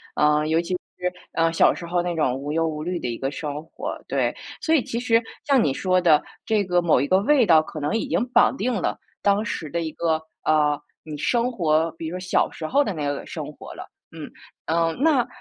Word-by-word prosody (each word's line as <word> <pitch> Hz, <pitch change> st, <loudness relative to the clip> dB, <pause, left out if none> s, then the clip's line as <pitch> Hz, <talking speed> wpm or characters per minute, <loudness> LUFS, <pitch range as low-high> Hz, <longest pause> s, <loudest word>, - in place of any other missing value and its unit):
嗯， 150 Hz, 0 st, +3 dB
尤 160 Hz, +1 st, +3 dB
其 170 Hz, +2 st, -3 dB, 0.2 s
是， 180 Hz, 0 st, -2 dB, 0.2 s
嗯， 165 Hz, 0 st, +2 dB
小 -, -, +5 dB
时 170 Hz, -, -8 dB
候 175 Hz, +1 st, 0 dB
那 175 Hz, 0 st, -2 dB
种 150 Hz, -6 st, +1 dB
无 140 Hz, +2 st, -5 dB
忧 165 Hz, +1 st, +1 dB
无 155 Hz, -1 st, -4 dB
虑 175 Hz, +1 st, -2 dB
的 -, -, -4 dB
一 120 Hz, -1 st, -3 dB
个 135 Hz, -, -1 dB
生 150 Hz, 0 st, -5 dB
活， 160 Hz, -, -6 dB
对。 -, -, 0 dB, 0.3 s
所 320 Hz, -, +1 dB
以 295 Hz, -6 st, +4 dB
其 235 Hz, -, -3 dB
实 235 Hz, -1 st, +2 dB, 0.2 s
像 275 Hz, -5 st, +4 dB
你 140 Hz, -, +1 dB
说 185 Hz, +4 st, +1 dB
的 160 Hz, -4 st, +5 dB, 0.2 s
这 215 Hz, -2 st, +2 dB
个 180 Hz, -1 st, +2 dB
某 170 Hz, -6 st, +3 dB
一 140 Hz, -, 0 dB
个 185 Hz, +4 st, +4 dB
味 255 Hz, +4 st, +4 dB
道 165 Hz, -5 st, +6 dB
可 155 Hz, 0 st, -8 dB
能 150 Hz, +5 st, -1 dB
已 225 Hz, -, -1 dB
经 -, -, 0 dB
绑 250 Hz, -, +4 dB
定 255 Hz, -1 st, 0 dB
了 205 Hz, -, -2 dB, 0.2 s
当 205 Hz, +2 st, +2 dB
时 160 Hz, -7 st, -4 dB
的 170 Hz, +3 st, -2 dB
一 160 Hz, -1 st, -3 dB
个， 160 Hz, 0 st, 0 dB, 0.2 s
呃， 150 Hz, -1 st, +2 dB, 0.2 s
你 155 Hz, -1 st, -7 dB
生 240 Hz, -, +1 dB
活 165 Hz, -6 st, +1 dB
比 165 Hz, 0 st, -6 dB
如 160 Hz, -, -5 dB
说 -, -, -6 dB
小 180 Hz, 0 st, +1 dB
时 160 Hz, -, -7 dB
候 285 Hz, -, +3 dB
的 205 Hz, -, -3 dB
那 150 Hz, -4 st, -3 dB
个 145 Hz, 0 st, -3 dB
生 -, -, -6 dB
活 -, -, -11 dB
了。 -, -, -8 dB, 0.3 s
嗯。 -, -, -9 dB, 0.4 s
嗯， 165 Hz, 0 st, +1 dB
那 290 Hz, -7 st, +3 dB
165 Hz, 255 characters per minute, -23 LUFS, 155-205 Hz, 0.4 s, 道